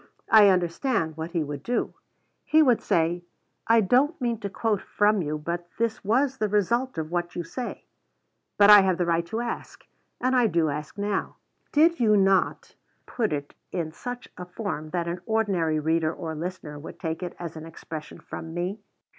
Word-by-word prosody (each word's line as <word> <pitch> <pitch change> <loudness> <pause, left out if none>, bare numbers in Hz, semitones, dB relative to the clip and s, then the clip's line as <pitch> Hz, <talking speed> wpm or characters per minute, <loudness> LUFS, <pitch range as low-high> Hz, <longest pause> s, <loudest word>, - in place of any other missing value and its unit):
I 215 -2 +8
understand 175 - 0
what 160 +1 -5
he 170 -2 -1
would 145 -1 -6
do. 245 +8 -1 0.5
He 315 0 +5
would 250 -5 +3
say, 170 +1 +1 0.4
"I 230 0 +5
don't 265 - +2
mean 235 -4 -1
to 200 - -4
quote 210 0 -1
from 210 -1 +2
you, 150 -1 -2
but 170 +3 -4
this 230 -1 -1
was 260 +6 +1
the 215 - 0
result 235 +5 +1
of 160 0 -3
what 175 0 -2
you 175 - -2
say." 240 +9 -6 0.7
But 205 0 +8
I 205 -1 +11
have 190 -2 +1
the 175 - +1
right 170 0 0
to 225 +4 -3
ask, 240 -1 -6 0.3
and 255 +1 +1
I 245 -2 +4
do 165 -5 +1
ask 150 +6 -5
now, 205 0 -2 0.4
Did 330 +3 +4
you 215 -3 +4
not 195 -1 +2 0.3
put 225 -4 -1
it 145 -1 -4 0.2
in 165 -4 -3
such 245 +8 -7
a 180 - -5
form 180 -6 -5
that 170 0 -2
an 175 +1 -3
ordinary 190 -8 +1
reader 160 +1 +1
or 165 -2 -5
listener 160 -2 -6
would 150 - -10
take 160 -1 -3
it 180 -1 -5
as 170 -2 -6
an 160 0 -8
expression 160 -1 -8
from 165 0 -8
me? 185 +4 -3
180 Hz, 190 wpm, -26 LUFS, 165-225 Hz, 0.7 s, I